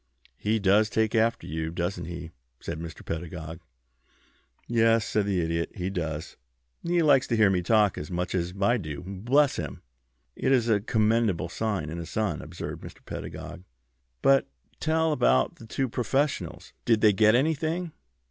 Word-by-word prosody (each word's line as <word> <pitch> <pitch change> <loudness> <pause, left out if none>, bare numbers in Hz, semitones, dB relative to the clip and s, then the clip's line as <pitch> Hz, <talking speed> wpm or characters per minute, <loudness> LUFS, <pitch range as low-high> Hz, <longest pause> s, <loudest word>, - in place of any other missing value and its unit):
"He 110 +2 +1
does 105 +1 +3
take 110 -1 +1
after 115 0 +2
you, 80 +1 -3
doesn't 85 +1 -3
he?" 85 -1 -7 0.3
said 80 - -5
Mr. 80 0 -8
Pedagog. 80 -1 -5 1.1
"Yes," 115 -1 +3
said 105 -2 0
the 95 -3 +1
Idiot, 85 0 -1
"he 95 -1 -3
does. 80 -3 -4 0.4
He 170 0 +1
likes 140 -3 +4
to 115 - 0
hear 105 -3 +5
me 90 -2 +1
talk 105 +1 +3
as 75 - -7
much 90 0 -2
as 90 -1 -1
I 120 +5 +3
do, 75 -8 -6
bless 120 +10 +2
him!" 75 -5 -5 0.5
"It - - 0
is 125 -3 +3
a 105 -2 +4
commendable 110 -5 +1
sign 100 -7 -2
in 85 - -5
a 85 - -6
son," 105 +2 -1
observed - - -7
Mr. - - -12
Pedagog. - - -7 0.6
"But 135 0 +5 0.3
tell 160 0 +1
about 125 - +2
the 115 - -12
two 135 +4 -1
professionals. 135 +5 -2
Did 115 -3 +3
they 105 -2 +6
get 110 +2 +5
anything?" 160 +5 0
105 Hz, 165 wpm, -27 LUFS, 85-120 Hz, 1.1 s, they